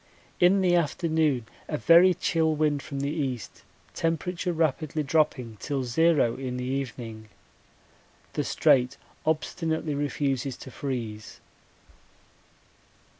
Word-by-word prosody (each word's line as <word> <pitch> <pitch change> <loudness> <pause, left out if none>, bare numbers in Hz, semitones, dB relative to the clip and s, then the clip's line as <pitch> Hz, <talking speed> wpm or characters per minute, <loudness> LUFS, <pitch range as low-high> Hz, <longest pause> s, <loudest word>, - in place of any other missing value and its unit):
In 185 +2 +5
the 180 -2 +3
afternoon 160 -5 +1 0.2
a 150 - -2
very 175 +4 +6
chill 160 -5 +1
wind 150 -2 +1
from 140 -2 -5
the 140 +1 -1
east, 135 -7 -4 0.3
temperature 170 +2 -1
rapidly 155 -1 0
dropping 135 -6 0
till 140 -3 -2
zero 135 -1 +3
in 130 -2 -4
the 125 - -3
evening. 120 -5 -5 1.0
The - - -1
Strait 125 +1 +3 0.3
obstinately 160 0 -1
refuses 140 -2 -1
to 130 - -10
freeze. 115 -6 -5
145 Hz, 110 wpm, -27 LUFS, 130-160 Hz, 1.0 s, very